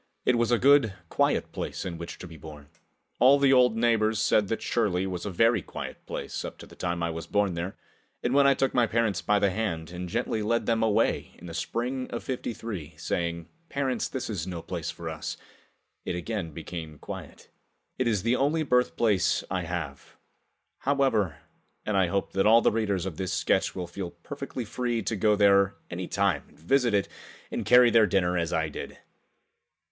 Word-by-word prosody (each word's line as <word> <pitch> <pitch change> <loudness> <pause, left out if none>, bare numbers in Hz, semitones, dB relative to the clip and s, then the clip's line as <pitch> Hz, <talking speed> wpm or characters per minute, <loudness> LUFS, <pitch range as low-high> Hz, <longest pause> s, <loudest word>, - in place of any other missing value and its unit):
It 125 - +4
was 120 -1 +1
a 120 - +4
good, 135 -6 +5
quiet - - +1
place - - -4
in 85 -3 -5
which 85 - -7
to 90 - -9
be 85 - -11
born. 75 -2 -11 0.5
All 135 +3 +7
the 140 -1 +4
old 125 -3 +5
neighbors 110 -2 +2
said 105 0 +3
that 115 - -2
Shirley 95 -6 +1
was 90 0 -4
a - - -1
very 115 +3 +3
quiet - - -7
place - - -4
up - - -7
to - - -11
the - - -15
time 85 -1 -2
I 85 - 0
was 80 0 -6
born 100 -1 +1
there, 85 +3 -4 0.5
and 120 - +1
when 140 0 +6
I 140 - +5
took 135 0 0
my 120 -2 +3
parents 110 -5 +1
by 105 +4 +2
the 100 -1 +2
hand 90 -6 -3
and 90 0 -5
gently 110 +2 -1
led 115 +3 0
them 115 -1 +1
away 110 -2 +1
in - - -13
the 85 - -7
spring 125 +10 -2
of - - -5
'53, 110 - -5
saying, 85 0 -2 0.2
"Parents, 135 -2 -1
this 130 - -4
is 95 -6 -3
no 85 -3 -5
place - - -4
for - - -7
us," - - -5 0.7
it - - -3
again 90 0 -3
became 80 -1 -7
quiet. - - -9 0.5
It 130 - +2
is 105 -5 +1
the 115 +2 +2
only 150 +5 +1
birthplace 120 -6 +2
I 90 0 0
have, 80 -5 -6 0.6
however, 130 - +1 0.5
and 105 - -1
I 95 -2 +4
hope 100 +2 -2
that 95 +2 +3
all 115 +2 +7
the - - +4
readers 100 -5 0
of 90 -5 -5
this 95 -1 -2
sketch 85 - +1
will 90 -2 -3
feel 90 +1 -6
perfectly 125 +8 -7
free 120 0 -2
to 110 - -1
go 105 +1 +3
there 100 -1 +4 0.2
any 90 +1 -4
time 100 -7 +1
and - - -22
visit 120 - +2
it 100 - +1 0.4
and - - -3
carry 125 -1 +7
their 110 -2 +6
dinner 90 -3 +1
as 85 -1 0
I 80 -2 +1
did. 75 - -7
100 Hz, 200 wpm, -27 LUFS, 85-120 Hz, 0.7 s, All